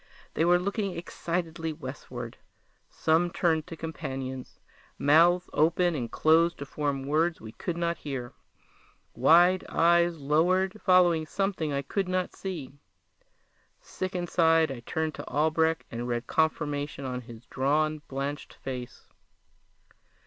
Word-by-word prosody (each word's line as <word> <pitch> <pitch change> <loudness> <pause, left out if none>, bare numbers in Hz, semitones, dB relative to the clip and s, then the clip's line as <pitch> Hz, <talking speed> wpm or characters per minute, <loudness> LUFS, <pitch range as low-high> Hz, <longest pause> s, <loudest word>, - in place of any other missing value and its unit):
They 165 - +1
were 175 +1 +5
looking 200 0 -2
excitedly 170 -1 -3
westward. 130 -5 -8 0.5
Some 165 +2 +2
turned 160 -3 0
to 165 - -7
companions. 130 -5 -6 0.4
Mouths 170 +5 +4
opened 170 +2 +2
and 120 -5 -4
closed 165 +2 +3
to 140 - -6
form 140 -1 -2
words 160 +4 +1
we 110 - -9
could 170 +8 -4
not 170 0 -1
hear. 130 -4 -5 0.8
Wide 175 +8 +5
eyes 170 0 +3
lowered, 185 +8 +1
following 175 -4 +4
something 195 -6 -1
I 140 0 -1
could 190 +6 -2
not 185 0 -1
see. 170 -9 -6 1.1
Sick 185 0 -5
inside, 165 -3 +3
I 130 - -6
turned 160 +6 -2
to - - -8
Albrecht 160 +3 +1
and 120 +1 -4
read 120 0 -2
confirmation 145 -3 -1
in 125 -1 -3
his 115 -1 -12
drawn, 155 +3 0
blanched 140 +2 -5
face. 125 -2 -7
160 Hz, 125 wpm, -28 LUFS, 140-175 Hz, 1.1 s, were